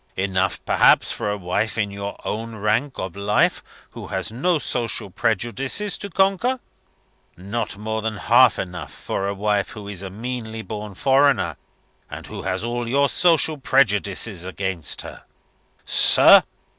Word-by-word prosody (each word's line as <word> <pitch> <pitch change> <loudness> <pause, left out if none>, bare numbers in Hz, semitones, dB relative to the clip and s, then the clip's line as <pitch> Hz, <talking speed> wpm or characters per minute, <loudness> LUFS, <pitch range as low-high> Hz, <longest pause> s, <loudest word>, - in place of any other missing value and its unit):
Enough, 95 0 -1
perhaps, - - +4
for - - -3
a 105 - -2
wife 100 +5 -2
in 105 -2 -1
your 100 0 -6
own 115 +1 -4
rank 110 +6 -1
of 95 -2 -5
life 100 0 +1 0.3
who - - -9
has 95 +2 -3
no 160 +9 +1
social 115 -8 -2
prejudices 120 - -1
to 200 - -6
conquer. 195 +8 +1 0.8
Not 100 +3 -4
more 110 +1 -3
than 110 -1 -3
half 120 +2 +5
enough 90 -2 -6
for 100 - -4
a 100 - -3
wife 105 0 0
who 105 -2 -9
is 100 -3 -4
a 95 - -6
meanly 110 +1 -6
born 105 -2 -7
foreigner, 135 0 +2 0.5
and - - -8
who - - -7
has 95 +1 -2
all 120 0 -3
your 140 +3 +2
social 160 -3 +3
prejudices 105 -7 +1
against 95 -2 -3
her.' - - -10 0.6
Sir! - - +7
110 Hz, 150 wpm, -22 LUFS, 100-125 Hz, 0.8 s, Sir